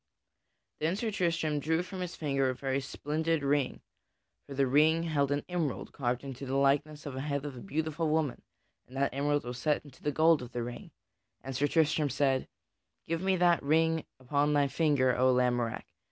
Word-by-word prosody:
Then 160 Hz, +4 st, 0 dB
Sir 220 Hz, +2 st, -2 dB
Tristram 165 Hz, -5 st, 0 dB
drew 160 Hz, +4 st, 0 dB
from 185 Hz, +1 st, -8 dB
his 180 Hz, -1 st, -4 dB
finger 140 Hz, -3 st, 0 dB
a 130 Hz, -, -2 dB
very 135 Hz, +1 st, -1 dB
splendid 155 Hz, +3 st, -1 dB
ring 140 Hz, -2 st, 0 dB, 0.7 s
(for 140 Hz, -, -7 dB
the 135 Hz, 0 st, +3 dB
ring 155 Hz, +5 st, +4 dB
held 145 Hz, -4 st, 0 dB
an 145 Hz, 0 st, -1 dB
emerald 160 Hz, -, -2 dB
carved 125 Hz, -1 st, -2 dB
into 135 Hz, -1 st, -7 dB
the 135 Hz, -, -2 dB
likeness 145 Hz, +2 st, +1 dB
of 140 Hz, -, -5 dB
the 130 Hz, -, -4 dB
head 140 Hz, 0 st, -2 dB
of 145 Hz, -3 st, -5 dB
a -, -, -8 dB
beautiful 160 Hz, -2 st, -2 dB
woman, 155 Hz, -4 st, 0 dB, 0.5 s
and 130 Hz, -, -10 dB
that 140 Hz, 0 st, +1 dB
emerald 145 Hz, +1 st, 0 dB
was 125 Hz, 0 st, -6 dB
set 150 Hz, +3 st, 0 dB
into 135 Hz, -3 st, -16 dB
the 150 Hz, -, 0 dB
gold 160 Hz, +1 st, +4 dB
of 125 Hz, 0 st, -9 dB
the 120 Hz, -, -2 dB
ring) 120 Hz, -, -7 dB, 0.5 s
and 135 Hz, 0 st, -5 dB
Sir 145 Hz, +3 st, +2 dB
Tristram 155 Hz, -1 st, +2 dB
said: 135 Hz, 0 st, +1 dB, 0.6 s
"Give 165 Hz, +1 st, -1 dB
me 190 Hz, 0 st, +2 dB
that 175 Hz, -1 st, +3 dB
ring 160 Hz, +2 st, +2 dB, 0.2 s
upon 145 Hz, +3 st, +1 dB
thy 145 Hz, -1 st, +3 dB
finger, 140 Hz, -5 st, +2 dB
O 130 Hz, +1 st, +4 dB
Lamorack! 120 Hz, -2 st, +1 dB
145 Hz, 195 wpm, -30 LUFS, 135-160 Hz, 0.7 s, ring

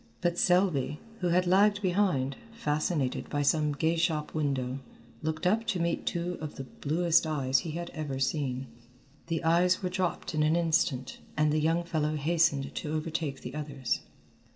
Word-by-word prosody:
But 175 Hz, -1 st, +1 dB
Selby, 175 Hz, -6 st, +2 dB, 0.2 s
who 180 Hz, -, 0 dB
had 180 Hz, +1 st, +3 dB
lagged 205 Hz, +3 st, +4 dB
behind, 180 Hz, -8 st, +1 dB, 0.2 s
fascinated 150 Hz, -, -1 dB
by 145 Hz, -1 st, 0 dB
some 150 Hz, +1 st, +2 dB
gay 160 Hz, +4 st, +1 dB
shop 160 Hz, -3 st, 0 dB
window, 135 Hz, -4 st, -1 dB, 0.4 s
looked 160 Hz, +1 st, -3 dB
up 220 Hz, +5 st, +2 dB
to 205 Hz, -6 st, 0 dB
meet 170 Hz, 0 st, -1 dB
two 175 Hz, +1 st, -2 dB
of 155 Hz, -1 st, -5 dB
the 135 Hz, -, -5 dB
bluest 165 Hz, +5 st, +1 dB
eyes 135 Hz, -4 st, +2 dB
he 165 Hz, -, -5 dB
had 170 Hz, +1 st, -5 dB
ever 150 Hz, -4 st, -4 dB
seen. 135 Hz, -1 st, -1 dB, 0.6 s
The 165 Hz, 0 st, -1 dB
eyes 175 Hz, +3 st, +3 dB
were 180 Hz, -, 0 dB
dropped 180 Hz, -2 st, -2 dB
in 155 Hz, -, +1 dB
an 155 Hz, +2 st, +3 dB
instant, 160 Hz, -6 st, +1 dB, 0.2 s
and 150 Hz, 0 st, +3 dB
the 155 Hz, -, +2 dB
young 165 Hz, +2 st, +2 dB
fellow 155 Hz, -3 st, -1 dB
hastened 150 Hz, -2 st, +1 dB
to 150 Hz, -, -4 dB
overtake 155 Hz, -3 st, -3 dB
the 125 Hz, -, -7 dB
others. 140 Hz, -4 st, -2 dB
160 Hz, 170 wpm, -29 LUFS, 145-175 Hz, 0.6 s, lagged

